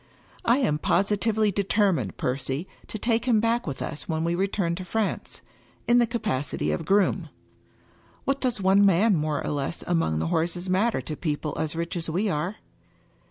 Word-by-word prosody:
I 235 +2 +4
am 205 - +1
positively 210 +4 +2
determined, 195 - +1
Percy, 135 +5 -2 0.2
to - - -5
take 230 +2 0
him 235 -4 +4
back 230 0 +1
with 140 - -3
us 150 - -6
when 160 0 0
we 170 +1 0
return 190 -1 0
to 185 - -5
France, 210 +3 -3 0.4
in 240 +1 +5
the 240 - +3
ca 235 +1 -2
pacity 145 - -1
of 165 - -3
groom. 200 +2 +2 1.0
What 275 0 0
does 250 -5 0
one 195 +1 +4
man 200 +2 +4
more 150 -2 -1
or - - -1
less 145 +3 -3
among 165 - +1
the 80 +1 -1
horses 175 +3 0
matter 190 - +1
to 150 +4 -5
people 150 -1 -3
as 160 0 -2
rich 170 +1 -3
as 165 -1 -3
we 190 +6 0
are?" 150 -2 -2
185 Hz, 180 wpm, -26 LUFS, 155-215 Hz, 1.0 s, in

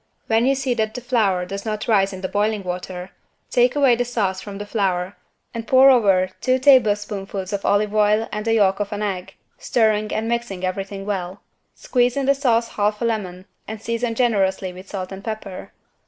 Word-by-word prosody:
When 225 +2 +2
you 275 - +3
see 265 -2 -1
that 220 -1 -2
the - - -3
flour 215 -8 +1
does 195 +2 -6
not 215 -1 -4
rise 195 -4 +3
in 190 -1 -8
the 190 - -2
boiling 205 +1 -1
water, 180 0 -6 0.4
take 245 +2 +3
away 275 -4 +4
the 245 - 0
sauce 200 -6 -2
from 200 -1 -8
the 205 - -6
flour 190 -3 -1 0.4
and 230 -1 -6
pour 265 +2 +7
over 195 -7 +3
two 255 0 +2
tablespoonfuls 205 -7 +2
of 200 - -2
olive 205 +1 +1
oil 215 +1 +2
and 210 0 -3
the 225 0 +1
yolk 195 -2 +3
of 205 0 -3
an 210 0 -3
egg, 190 -3 -4 0.2
stirring 215 -2 +1
and 220 +1 -2
mixing 235 -6 -2
everything 195 +1 -4
well. 190 -2 -4 0.3
Squeeze 245 0 0
in 275 - 0
the 275 - +4
sauce 240 -4 +1
half 210 0 -1
a 235 - -1
lemon 190 -5 -3 0.2
and 220 0 -6
season 230 +1 -2
generously 195 -6 +1
with 185 +2 -12
salt 185 -2 -5
and 195 +1 -8
pepper. 215 -4 -6
210 Hz, 200 wpm, -21 LUFS, 195-230 Hz, 0.4 s, pour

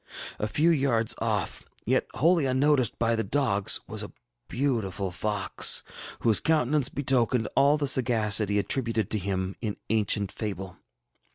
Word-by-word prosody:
A 105 - -1
few 155 +9 +2
yards 130 -7 +2
off, - - -2 0.2
yet - - 0
wholly 165 -1 +2
unnoticed 130 -2 +1
by 115 0 +1
the 110 - -1
dogs, 110 -9 +1
was - - -3
a - - -7 0.4
beautiful 110 -8 -2
fox, 105 +2 +1 0.4
whose 110 -3 +4
countenance 150 -3 +1
betokened 125 -4 0
all 145 +2 +4
the 145 - -2
sagacity 110 -6 +3
attributed 115 -1 0
to 110 - +1
him 95 0 -3
in 105 -3 -4
ancient 105 -2 0
fable. 95 -4 -6
115 Hz, 140 wpm, -26 LUFS, 105-135 Hz, 0.4 s, whose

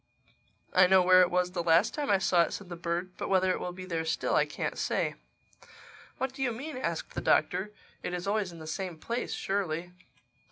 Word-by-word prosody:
"I 185 0 +6
know 190 0 +6
where 185 0 +7
it 180 - +4
was 180 0 +1
the 180 -1 -2
last 170 +4 +4
time 290 -2 -3
I 200 - +5
saw 180 -2 +3
it," 170 - 0
said 200 -3 -7
the 175 - -5
bird. 170 +2 -3
"But - - -4
whether 185 -1 +3
it - - -1
will 180 - -4
be 185 +1 -8
there 165 -3 -2
still, 160 - -1
I - - +3
can't - - -3
say." - - -1 1.0
"What 265 0 -2
do 270 - -8
you 255 -2 +1
mean?" 275 +6 -6
asked 255 - -3
the - - -3
Doctor. 205 +3 +2 0.3
"It - - -4
is 180 0 -4
always 200 -2 0
in 170 - -11
the 160 - -9
same 180 +1 -4
place 235 +9 -3
surely?" 180 -3 -2
185 Hz, 225 wpm, -29 LUFS, 175-200 Hz, 1.0 s, where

